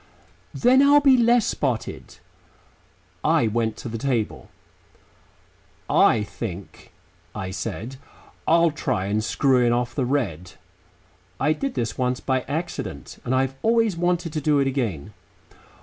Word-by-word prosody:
"Then 255 +2 +4
I'll 285 +1 +6
be 275 -2 +5
less 240 -2 +4
spotted." 125 -6 -3 1.1
I - - +3
went 110 0 -1
to - - -7
the 115 -1 -5
table. 125 -5 -2 1.4
"I 110 - +4
think," 100 -3 -8 0.4
I 95 -3 -4
said, 110 +7 -5 0.5
"I'll 170 0 +4
try 130 - -2
and 105 +2 -1
screw 130 +2 +2
in 120 - +3
off 120 0 -1
the 135 - -1
red." 100 - -2 0.9
(I 155 - +2
did 275 - -4
this 115 +1 -3
once 125 0 0
by 130 -1 0
accident 165 +4 -5
and 125 - -1
I've 135 0 +1
always 225 -3 +2
wanted 175 -1 -1
to 155 - -2
do 150 0 +2
it 140 - +2
again.) 110 - -3
130 Hz, 135 wpm, -23 LUFS, 110-170 Hz, 1.4 s, I'll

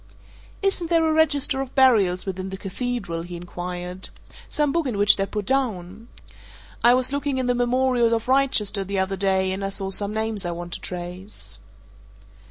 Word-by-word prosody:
"Isn't 390 -4 0
there 330 -2 +3
a 315 - +2
register 290 -3 +2
of 265 -1 -7
burials 215 -9 +4
within 190 0 -4
the 190 - -6
Cathedral?" 200 -3 -4
he 175 +1 -8
inquired. 180 +1 -6 0.4
"Some 295 -2 0
book 335 -1 0
in 235 -5 -2
which 205 +1 +6
they're 195 0 -1
put 210 -1 -4
down? 220 -5 -2 0.8
I 240 +1 +7
was 255 +1 +1
looking 285 -1 -1
in 260 - -1
the 245 - +2
Memorials 245 -1 +2
of 230 0 -1
Wrychester 255 -7 +2
the 195 +1 -4
other 190 +1 0
day, 190 -1 +1
and 190 +1 -4
I 195 - -1
saw 195 -1 -1
some 200 +1 +5
names 220 -1 -2
I 175 - -3
want 175 0 -6
to - - -4
trace." 180 +3 -7
210 Hz, 180 wpm, -23 LUFS, 190-260 Hz, 0.8 s, I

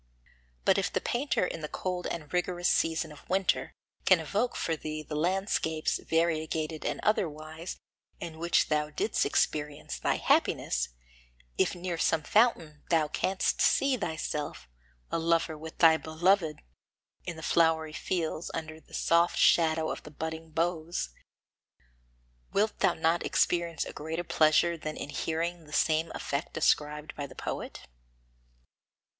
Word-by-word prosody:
But - - +5
if - - -1
the - - 0
painter 245 -5 0
in 165 - -5
the 155 - -3
cold 180 -1 -3
and 155 -2 -6
rigorous 180 0 0
season 160 -1 +1
of 150 - -15
winter 190 0 +1 0.3
can 185 -3 +5
evoke 210 +10 -1
for 165 - -1
thee 155 0 -5
the 155 - -8
landscapes, 160 -1 0
variegated 160 -1 0
and - - -2
otherwise, 160 -4 -1 0.4
in 160 -2 -7
which 170 0 +2
thou 150 -1 +1
didst 410 - 0
experience 145 - -1
thy - - +1
happiness; - - +1 0.7
if - - +1
near 175 -1 -4
some 160 -2 +2
fountain 170 -8 +2
thou 160 -3 +3
canst 190 +4 0
see 275 -1 +4
thyself, 155 - -4 0.4
a - - 0
lover 165 -1 +1
with 160 +1 -9
thy 160 -1 +7
beloved, 160 +1 +1 0.6
in 175 - -4
the 160 - -9
flowery 160 -2 +2
fields, 165 +1 -2
under 160 -1 -5
the - - -12
soft 170 +1 +3
shadow 160 -1 +4
of - - -5
the - - -11
budding 160 +2 -5
boughs, 165 - -1 1.4
wilt 210 +2 +1
thou 175 - +3
not 165 +1 +1
experience 170 -3 +1
a - - -7
greater 160 +3 -4
pleasure 160 +1 +3
than 155 0 -5
in - - -5
hearing 165 +3 -2
the 150 - -15
same 160 +2 +2
effect 140 +3 -3
described 150 0 +1
by 145 -1 -4
the - - -14
poet? - - -5
160 Hz, 145 wpm, -29 LUFS, 155-175 Hz, 1.4 s, thy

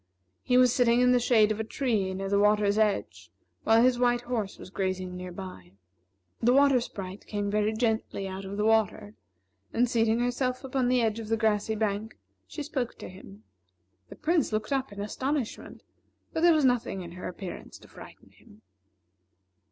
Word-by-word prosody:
He 250 - +2
was 250 -1 +5
sitting 240 -1 +3
in 250 0 +4
the 250 - +4
shade 220 -3 +4
of 215 - -2
a - - 0
tree 220 -5 -1
near 195 +1 -4
the 200 +1 +2
water's 210 0 +3
edge, 95 - -1 0.3
while 225 +1 +5
his 250 -1 +3
white 245 -1 +2
horse 235 -5 -3
was 185 - -11
grazing 185 -1 -3
near 180 0 -7
by. 175 - -10 0.7
The 240 +2 +4
Water 275 -3 +5
Sprite 195 -4 -8
came 205 -1 -2
very 210 +1 +1
gently 220 -3 -1
out 190 +1 -6
of 195 +1 -6
the 210 - 0
river, 220 -1 +1 0.6
and 245 +2 +2
seating 225 -1 +1
herself 250 +1 -1
upon 260 -1 -1
the 250 -1 +2
edge 220 0 0
of 225 - -7
the 225 +1 0
grassy 220 0 +1
bank, 215 0 -2 0.3
she 300 - -6
spoke 265 -5 -3
to - - -9
him. 105 - -13 0.7
The - - -10
Prince 320 -5 0
looked 215 +4 -2
up 270 -3 -1
in 200 - -9
astonishment, 260 +4 -4 0.5
but 320 - -1
there 345 0 +6
was 305 -3 +3
nothing 245 -6 0
in 170 -1 -8
her 180 +1 -7
appearance 180 0 -8
to - - -17
frighten - - -14
him. 105 +2 -21
220 Hz, 185 wpm, -28 LUFS, 195-245 Hz, 0.7 s, there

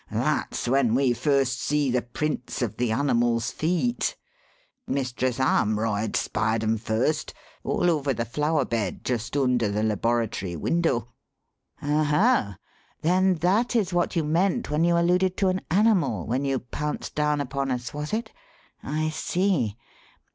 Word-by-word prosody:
That's - - -1
when 125 -2 +3
we 130 -2 +3
first 135 0 +1
see 145 -2 +1
the 125 0 +1
prints 125 +1 -3
of 115 - -3
the 120 -2 0
animal's 120 -2 +1
feet. 180 +10 0 0.7
Mistress 130 -2 -1
Armroyd 110 -3 +1
spied 110 +1 0
'em 110 +1 +1
first 115 +8 -1 0.3
all 175 - 0
over 150 -5 +1
the 115 -2 -2
flower 150 +3 0
bed 110 -6 -3
just 120 +2 -2
under 125 -5 +2
the 105 +1 -1
laboratory 110 -4 -1
window." 125 - 0 0.7
"Oho! 150 - +2 0.5
then 185 +3 +3
that 215 +8 +2
is 205 -6 +1
what 175 +1 0
you 165 - +2
meant 180 +7 0
when 150 +2 +2
you 170 0 +3
alluded 180 +2 +2
to 195 -2 +2
an 185 0 -1
'animal' 185 - +2
when 130 +5 -1
you 135 -1 +1
pounced 150 +4 -4
down 150 0 +1
upon 140 0 -2
us, 125 -1 -3
was 150 +1 -4
it? 220 +1 -2 0.5
I 155 +2 -1
see. 155 - 0
140 Hz, 145 wpm, -25 LUFS, 120-170 Hz, 0.7 s, when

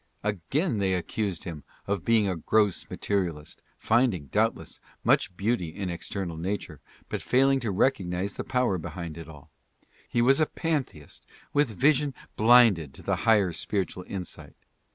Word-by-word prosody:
Again 105 - -1
they 95 -1 +1
accused 95 0 -3
him 80 -5 -7 0.2
of 100 -3 -2
being 115 -3 +3
a 95 - -1
gross 105 +4 +1
materialist, 85 -7 -3 0.2
finding, 110 - +1
doubtless, - - -1 0.2
much 90 - +2
beauty 100 -5 0
in 95 +2 -4
external 85 -1 -4
nature, 90 -3 -4 0.3
but - - -4
failing 135 +1 +3
to 115 -5 -2
recog 100 -1 +1
nize 90 +3 -2
the - - -4
power 125 -8 0
behind 85 0 -6
it 85 -1 -9
all. 75 -3 -14 0.6
He 120 - +2
was 135 +4 +5
a 155 - +3
pantheist 140 - -4 0.3
with 145 -8 +1
vision 145 0 +3 0.2
blinded 110 - +5
to - - -11
the - - 0
higher 100 -6 +4
spiritual 95 +1 -3
insight. 95 -3 -7
100 Hz, 155 wpm, -27 LUFS, 85-120 Hz, 0.6 s, was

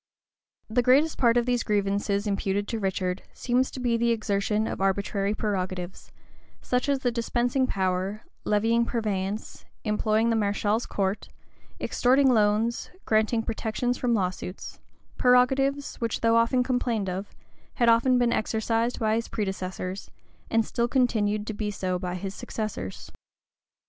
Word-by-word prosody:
The 230 +3 +2
greatest 275 +6 +3
part 235 -1 +4
of 240 - +2
these 245 -1 +1
grievances 200 0 0
imputed 200 0 -1
to 225 - -2
Richard, 185 -2 -1
seems 255 +1 +1
to - - -8
be 240 -2 +1
the 235 0 +1
exertion 215 -1 0
of - - -4
arbitrary 200 +1 0
prerogatives; 185 -3 -3 0.5
such 250 +2 -1
as 275 -2 +1
the 245 -3 +1
dispensing 245 +2 0
power,[*] 190 +1 -1 0.2
levying 225 +3 +2
purveyance,[] 210 -3 -3 0.2
employing 215 +1 +1
the - - +2
mareschal's 210 +1 0
court,[] 195 +1 -2 0.5
extorting 260 +1 +3
loans,[] 215 +2 +1 0.2
granting 220 +1 +2
protections 225 +2 -2
from 240 -2 +1
lawsuits;[] 185 -1 -4 0.4
prerogatives, 265 +3 +3
which, 230 -2 -2
though 230 0 +4
often 230 +2 +3
complained 245 -5 -1
of, 190 +2 -5 0.4
had 235 - +2
often 235 +2 +5
been 240 -1 +2
exercised 225 +2 0
by 220 -2 +1
his 230 +1 -1
predecessors, 190 -2 -4 0.4
and 225 -1 +2
still 235 +2 0
continued 215 -5 +1
to 220 - -4
be 210 0 -3
so 185 -3 -2
by 180 -1 -3
his 190 +1 -5
successors. 205 - -5
220 Hz, 140 wpm, -26 LUFS, 200-240 Hz, 0.5 s, often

